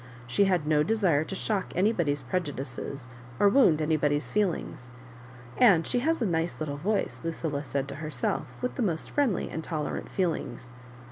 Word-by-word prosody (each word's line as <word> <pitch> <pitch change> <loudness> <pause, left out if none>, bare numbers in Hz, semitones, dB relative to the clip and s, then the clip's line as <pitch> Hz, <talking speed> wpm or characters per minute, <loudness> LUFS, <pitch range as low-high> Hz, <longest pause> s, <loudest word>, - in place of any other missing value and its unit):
She 125 +11 +2
had 180 -5 +1
no 150 -1 +3
desire 180 -6 +2
to 195 - -5
shock 200 0 -1
nnybody's 170 -8 +1
prejudices 140 -3 -4 0.3
or 205 - +6
wound 190 - +4
anybody's 150 -1 +1
f<..V..,g3. 180 -11 -1 0.7
"And 195 -9 +6
she 245 - +1
has 315 0 +1
a - - +2
nice 170 -2 -1
little 145 -2 -3
voice." 205 +7 -1
Lucilla 160 -3 -2
said 140 -1 -2
to 140 - -6
herself, 150 -5 -2 0.2
with 250 - -1
the - - -3
most 170 -8 -1
friendly 270 -10 +1
and 160 - -4
tolerant 155 -3 -3
feelings. 130 -9 -2
160 Hz, 160 wpm, -28 LUFS, 145-200 Hz, 0.7 s, or